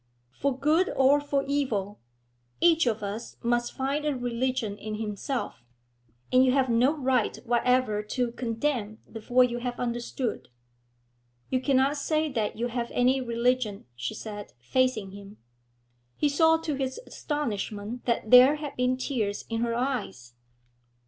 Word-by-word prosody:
For 260 - -1
good 315 +6 +3
or 275 +2 +4
for 285 -1 0
evil, 225 -8 -1 0.6
each 330 -4 +4
of 220 -2 0
us 205 +4 -5
must 240 0 +1
find 275 +3 -2
a 300 -2 0
religion 245 -3 -2
in 215 0 -5
himself, 210 - -4 0.7
and 255 0 +6
you 255 -1 +3
have 265 -2 +2
no 240 +4 +4
right 255 -5 +1
whatever 240 -2 +2
to 235 +3 -2
condemn 230 -2 -2
before 245 +3 +2
you 240 -1 -1
have 245 0 -4
understood.' 240 0 -3 1.0
'You 255 -1 +1
cannot 270 +2 +2
say 310 +1 0
that 220 -5 -1
you 240 +2 -1
have 235 0 -3
any 255 +2 +3
religion,' 235 -3 0
she 120 0 -4
said, 205 -2 -8
facing 220 - 0
him. 200 +1 -11 0.8
He 295 - +2
saw 320 +3 +4
to 315 -2 -2
his 265 -1 -3
astonishment 225 -5 -4
that 230 -2 -1
there 255 +4 +9
had 295 -1 -6
been 250 +1 +1
tears 225 -6 -2
in 225 0 -1
her 235 -1 0
eyes. 235 - -3
245 Hz, 145 wpm, -27 LUFS, 220-270 Hz, 1.0 s, there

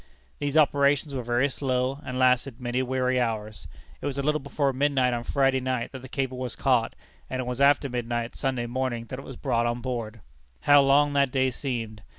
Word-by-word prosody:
These 145 +1 -1
operations 145 -1 +3
were 130 - -2
very 120 +3 +1
slow, 130 0 -1
and 130 - -5
lasted 130 0 +2
many 125 0 -1
weary 130 0 0
hours. 110 -3 -3 0.3
It - - -3
was 140 -1 -3
a 140 - -1
little 150 +1 +1
before 140 0 -1
midnight 130 -2 +2
on 120 0 -2
Friday 135 0 +2
night 130 -2 -2
that 130 - -8
the 130 - -11
cable 130 -1 -3
was 125 -2 -4
caught, 125 -4 +1 0.3
and 130 - -3
it 130 - -2
was 125 +2 -3
after 140 0 +4
midnight 120 -2 -3
Sunday 130 -3 -1
morning 120 -1 -2
that 130 - -5
it - - -10
was 135 - -9
brought 120 0 0
on 120 +1 -1
board. 115 -3 -5 0.4
How 145 0 +6
long 145 +1 +4
that 140 -1 +3
day 130 0 +1
seemed! 115 -5 -4
130 Hz, 205 wpm, -26 LUFS, 120-140 Hz, 0.4 s, How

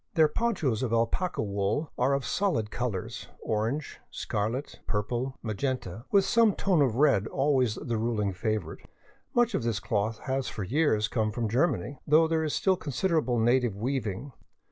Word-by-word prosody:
Their 160 -2 +6
ponchos 150 - 0
of 125 -4 -1
alpaca 115 - 0
wool 100 +9 -1
are. 135 +3 +2
of 140 - -2
solid 170 - 0
colors, 115 -7 -3
— - - -36
orange, 115 +8 -2
scarlet, 115 +7 -3
purple, 120 +5 -2
magenta 115 -1 -3
— - - -42
with 200 -2 +5
some 225 -1 +4
tone 185 -6 +2
of 130 -6 +2
red 120 -7 +3
always 135 -5 +1
the 120 -2 -3
ruling 110 -4 0
favorite. 110 +1 -3 0.5
Much 240 -1 +3
of 195 - 0
this 115 -3 -1
cloth 110 -1 -1
has 135 -1 -1
for 105 - -4
years 110 - +2
come 110 -1 0
from 115 +1 -2
Ger 125 +10 +3
many, 135 -2 -4
though 155 +2 +5
there 160 0 +1
is 155 - -1
still 190 -1 +2
considerable 155 -4 0
native 120 -1 +2
weaving. 120 +1 -3
125 Hz, 170 wpm, -28 LUFS, 110-150 Hz, 0.5 s, Their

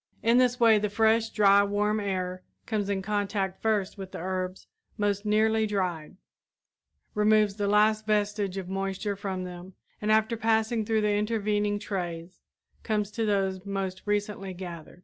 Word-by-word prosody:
In 235 +2 +5
this 250 -1 +2
way 225 -2 +6
the 210 0 -1
fresh, 225 +1 +2
dry, 200 -1 +5
warm 210 +1 0
air 185 -2 -3 0.2
comes 210 -3 -2
in 195 -1 -1
contact 200 -2 -2
first 210 -2 0
with 190 -1 -7
the - - -5
herbs 185 +1 -4 0.3
most 205 0 0
nearly 220 +1 +3
dried, 185 -4 -3 1.0
removes 210 -1 +3
the 205 -1 0
last 215 +1 +3
vestige 205 -2 0
of 190 -2 -4
moisture 195 +2 -2
from 190 -2 -4
them 180 +1 -9 0.3
and 215 0 +1
after 220 +2 +3
passing 220 0 +1
through 220 0 +1
the 210 -1 +2
intervening 210 -1 0
trays 180 -4 -5 0.4
comes 210 -2 -1
to 225 +1 -2
those 190 -2 0
most 195 -2 -3
recently 205 -2 -2
gathered. 175 -2 -9
205 Hz, 155 wpm, -27 LUFS, 190-215 Hz, 1.0 s, way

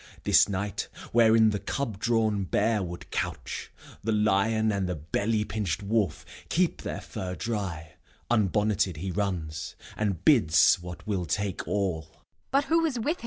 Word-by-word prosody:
This - - +5
night, 100 +1 -2 0.2
wherein 110 -1 +5
the 105 - -2
cub 110 0 -3
drawn 110 -3 +1
bear 105 +4 +1
would 85 -1 -7
couch, - - -4 0.3
The 110 - 0
lion 110 +1 +2
and 100 -3 -1
the 90 - -1
belly 105 +8 -1
pinched 105 -5 -2
wolf 100 -6 0 0.2
Keep 175 0 +1
their - - -4
fur 90 -1 -5
dry, 90 -9 -4 0.3
unbonneted 105 -4 +1
he 95 +4 -3
runs, 85 -6 -3 0.2
And 100 -5 -2
bids 100 - +5
what 90 0 -9
will 95 -5 -2
take 100 +4 -2
all. 85 -6 -2
100 Hz, 130 wpm, -27 LUFS, 90-110 Hz, 0.3 s, This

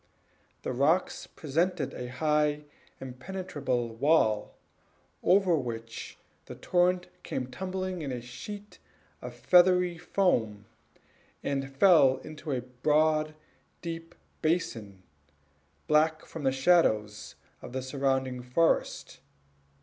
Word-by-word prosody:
The - - -2
rocks 155 +8 +1
presented 165 0 -1
a 125 - -6
high, 150 +2 0 0.4
impenetrable 130 -2 -4
wall, 115 -5 +2 0.7
over 185 -1 +4
which 115 -4 -5 0.3
the - - -8
torrent 180 0 +1
came 125 0 -4
tumbling 185 +3 -4
in 140 -3 -4
a 125 - -3
sheet 200 - -9 0.4
of - - -8
feathery 180 -1 +4
foam, 110 - 0 0.8
and 135 -1 -2
fell 145 -6 +6
into 155 0 -7
a 130 -2 -1
broad, 155 +5 +1 0.5
deep 165 -1 -6 0.3
basin, 115 - -2 0.8
black 155 +1 +2
from 160 -4 -7
the 135 - +4
shadows 130 -8 +2 0.3
of - - -9
the 130 0 -4
surrounding 130 -1 -1
forest. 125 +7 0
150 Hz, 105 wpm, -29 LUFS, 125-175 Hz, 0.8 s, fell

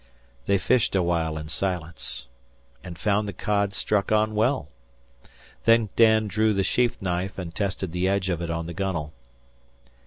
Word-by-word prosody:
They 100 - +4
fished 115 +2 +2
a 95 - +3
while 80 -2 0
in 75 0 -6
silence, 85 -5 -2 0.6
and 85 -2 -8
found 105 +4 +1
the 100 - -4
cod 100 +2 0
struck 100 +1 0
on 110 0 +2
well. 110 - +1 1.0
Then 115 -2 +4
Dan 110 -1 +5
drew 110 +2 +1
the 95 - +2
sheath 120 +3 +1
knife 90 +1 -2
and 90 -3 -6
tested 95 -2 -2
the 90 +2 0
edge 100 -1 +1
of 85 -3 -1
it 85 - -3
on 85 0 -2
the 85 - -6
gunwale. 85 -5 -3
95 Hz, 165 wpm, -25 LUFS, 85-105 Hz, 1.0 s, Dan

